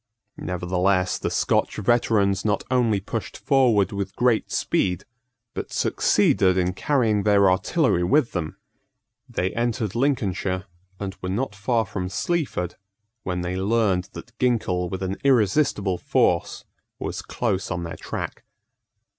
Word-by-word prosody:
Nevertheless 90 +1 0
the - - -2
Scotch - - +1
veterans 105 -3 +2
not 105 -1 0
only 120 -5 +2
pushed 110 +3 -5
forward 120 - +3
with 100 -1 -4
great 120 -2 +2
speed, 90 -2 0 0.5
but - - -5
succeeded 95 -1 +2
in 90 0 +1
carrying 110 -2 +1
their 100 -2 +4
artillery 95 - +1
with 130 +6 +2
them. 80 -4 -4 0.7
They 95 +1 -1
entered 115 -3 -1
Lincolnshire, 100 -8 0 0.3
and 95 -2 -4
were 90 - -3
not 105 +4 -2
far 110 +3 0
from 95 -2 -4
Sleaford, 145 - -2 0.4
when 90 -3 -3
they 90 +1 -3
learned 95 -2 +1
that 120 - -10
Ginkell 95 -8 +1
with 95 +1 -4
an 95 +1 -2
irresistible 105 -6 +2
force - - +1 0.3
was - - -4
close 105 -4 -2
on 85 -1 -3
their 85 -1 -6
track. - - -5
100 Hz, 130 wpm, -24 LUFS, 90-115 Hz, 0.7 s, their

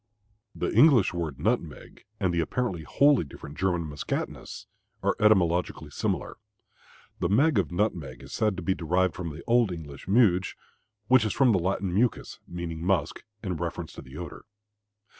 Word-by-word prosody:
The - - -2
English 120 - +6
word 80 -6 -3
nutmeg 85 -4 -3
and 95 -3 +1
the 85 - +1
apparently 90 +1 -1
wholly 140 - +3
different 70 0 -10
German 90 0 0
Muskatnuss, 75 -1 -5 0.4
are - - +2
etymologically 90 -5 +2
similar. - - -2 0.8
The 85 - 0
"meg" 135 +5 +4
of 90 -5 -1
nutmeg 85 -8 -2
is - - -11
said 105 -4 0
to 90 - -5
be 95 - +1
derived 90 +1 +1
from 90 -2 -5
the 75 +2 -9
old 120 -4 +3
English 75 -4 -8
"muge," 95 -4 +3 0.5
which 130 -2 +5
is 110 - -1
from 135 -4 +4
the 95 - +3
Latin 95 +1 -1
"muscus," 115 +5 0
meaning 85 -2 -5
musk, 95 +1 0 0.2
in 90 -5 -2
reference 85 0 -4
to - - -9
the 65 +3 -12
odor. 85 -4 -8
90 Hz, 160 wpm, -27 LUFS, 85-105 Hz, 0.8 s, English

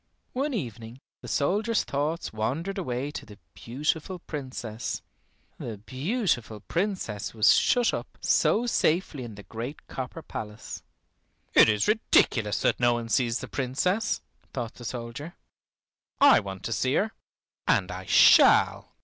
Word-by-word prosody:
One 275 +1 -1
evening 115 - -6 0.2
the - - -9
soldier's 210 +9 +1
thoughts 150 +2 -2
wandered 160 - -2
away 135 -4 -3
to - - -6
the 105 -2 -13 0.2
beautiful 150 +9 -2
Princess, 130 -8 -5 0.6
the 110 -3 -5
beautiful 130 - -2
Princess 170 - -2
who - - -17
was 105 - +6
shut 245 -2 +3
up - - -6
so 235 - +2
safely 165 - +1
in 115 -3 -8
the 100 - -11
great 120 +8 -7
copper 130 +5 -6
palace. 105 0 -7 0.7
"It - - +7
is 105 -1 +1
ridiculous 115 - +2
that - - +2
no 120 -1 +4
one 115 -1 -4
sees 115 +1 +1
the - - -6
Princess," 180 - -1 0.3
thought 120 -4 -4
the 120 - -11
soldier. 120 +7 -6 0.8
"I - - +7
want 95 -1 -7
to 115 - -2
see 130 +4 0
her, 215 +2 +1 0.6
and - - +2
I - - -7
shall." - - +5
130 Hz, 140 wpm, -27 LUFS, 115-175 Hz, 0.8 s, It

